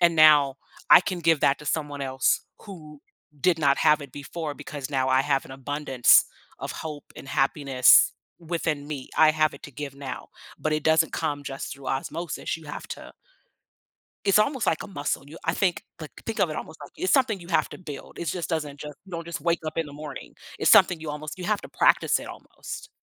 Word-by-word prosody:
"And 170 -2 +4
now 145 -3 +6 0.3
I - - +10
can 180 -2 -3
give 165 -2 +3
that 140 - +3
to 150 - -12
someone 145 -2 -2
else 130 -2 +1 0.2
who 155 -7 -11 0.4
did 180 -3 +3
not 140 -2 +3
have 150 0 +4
it 140 - -10
before 150 +1 -6
because 140 -2 -7
now 130 -1 0
I 130 0 +4
have 135 -1 0
an - - -14
abundance 135 -1 +3 0.3
of - - -5
hope 150 -3 -8
and - - -10
happiness 135 -2 +4 0.3
within 165 -3 -3
me. 145 -4 -6
I 155 -1 +6
have 155 0 +2
it - - -14
to 140 - -9
give 145 0 -6
now," 135 -2 -7 0.3
but 155 - -1
it 155 -1 -1
doesn't 160 0 +3
come 145 -3 -2
just 135 -1 -6
through 140 -2 -8
osmosis, 160 +5 -3
you 160 - -15
have 145 - -7
to - - -8 1.1
it's 200 +1 +5
almost 260 +3 +1
like 160 - +1
a - - -8
muscle, 145 -8 -3
you 160 - -11
I 160 - 0
think, 185 -3 0 0.2
like - - -8
think - - -4
of - - +3
it - - -4
almost - - -7
like - - -10
It's 370 - 0
something 250 -8 +2
you 170 - -12
have 165 - +2
to - - -9
build, 150 -6 -9
it 170 - -4
just 170 0 -3
doesn't 150 -4 -3
just 150 -1 -8
you 190 - -15
don't 170 -1 -5
just 170 - -5
wake 170 0 +1
up 155 - -5
in 165 - 0
the 145 - -11
morning, 150 -1 -8 0.3
it's - - +4
something 175 - +6
you 160 -1 -6
almost 150 +3 -6
you 180 - -7
have 210 -1 0
to - - -10
practice - - +3
it - - -8
almost. - - -9
150 Hz, 220 wpm, -25 LUFS, 140-165 Hz, 1.1 s, I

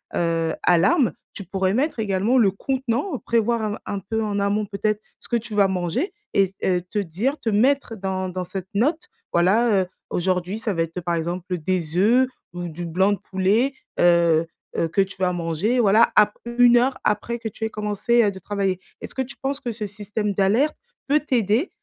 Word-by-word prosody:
heu, 165 -1 0
alarme, 245 - +4 0.2
tu 200 - -7
pourrais 190 +1 -1
mettre 275 -1 0
également 210 +4 +2
le 205 -5 +5
contenant, 265 - -2
prévoir 235 0 +1
un 210 -1 -2
un 200 - -3
peu 220 +4 -2
en 205 -1 -1
amont 200 +1 +1
peut-être 210 +1 -1 0.2
ce - - -12
que 240 - +1
tu 225 -1 -7
vas 200 -1 +4
manger 190 - -2 0.2
et 195 - +5
s 190 - -12
heu, 180 -1 +2
te 180 +4 -7
dire 205 - -2
te 225 - -2
mettre 250 +3 +2
dans 190 -2 -3
dans 180 0 -4
cette 185 +1 -6
note. 295 - +1 0.3
Voilà, 200 +4 +3
heu, - - -6 0.2
aujourd'hui, 185 +2 -1
ça 220 -2 -2
va 165 - -1
être, 165 +2 -3
par 175 0 -2
exemple, 175 +2 -3
des 170 -1 -2
œufs 240 +7 +4 0.3
ou 175 0 -5
du 170 +2 -6
blanc 190 +5 +2
de 200 - -4
poulet, 200 +10 +1 0.3
heu 170 -2 +4 0.3
heu, 165 - +1
que 195 - +2
tu 195 0 -3
vas 185 -1 +2
manger, 175 +8 0
voilà, 220 +1 +5
après 235 +3 +2
1 245 -1 +7
heure, 255 +2 +2
après 225 +3 0
que 230 - -5
tu 220 - -7
aies 220 - 0
commencé, 210 +3 +1
heu, 205 - +2
de 190 - -10
travailler. 195 -1 -1 0.2
Est-ce - - -7
que 265 - 0
tu 260 +1 -6
penses 275 +1 -2
que 240 - -4
ce 215 -1 -4
système 210 0 -3
d'alerte 215 +11 +2 0.3
peut 290 +2 +4
t'aider 245 - +1
205 Hz, 205 wpm, -23 LUFS, 185-235 Hz, 0.3 s, 1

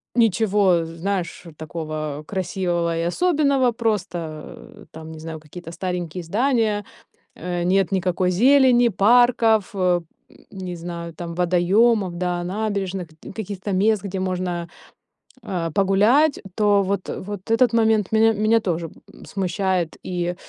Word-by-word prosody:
ничего 205 -6 +3
знаешь 175 +2 -4
такого 155 -2 -5
красивого 175 -3 -1
и 165 - -1
особенного, 280 - +2
просто 185 -9 -4
там 160 0 -10
не 160 - -9
знаю 160 0 -7
какие-то 165 +2 -10
старенькие 180 -1 -4
здания, 215 +1 0 0.5
э, 175 0 -3
нет 190 +1 +2
никакой 185 -1 +1
зелени, 245 +4 +5
парков, 225 0 +4
э, 180 -2 +2 0.3
м, - - -21
не 180 -2 -5
знаю, 170 0 -6
там 170 -1 -6
водоёмов, 180 +3 +2
да, 180 -1 -1
набережных, 195 -2 -3
гдь 155 +4 -13
каких-то 200 -2 -5
мест, 205 +2 +2
где 195 -1 -4
можно, 180 -2 -2 0.7
а, 170 -5 -3
погулять, 210 - +3
то 205 -1 +3
вот, 195 0 -2
э, - - -5
вот 205 +1 -8
этот 235 +1 +4
момент 220 -3 +2
меня 225 +1 +5
меня 215 +2 +2
тоже, 170 -5 -2 0.3
м, - - -14
смущает 185 -2 -1
и, 175 -1 -2
190 Hz, 130 wpm, -22 LUFS, 175-215 Hz, 0.7 s, зелени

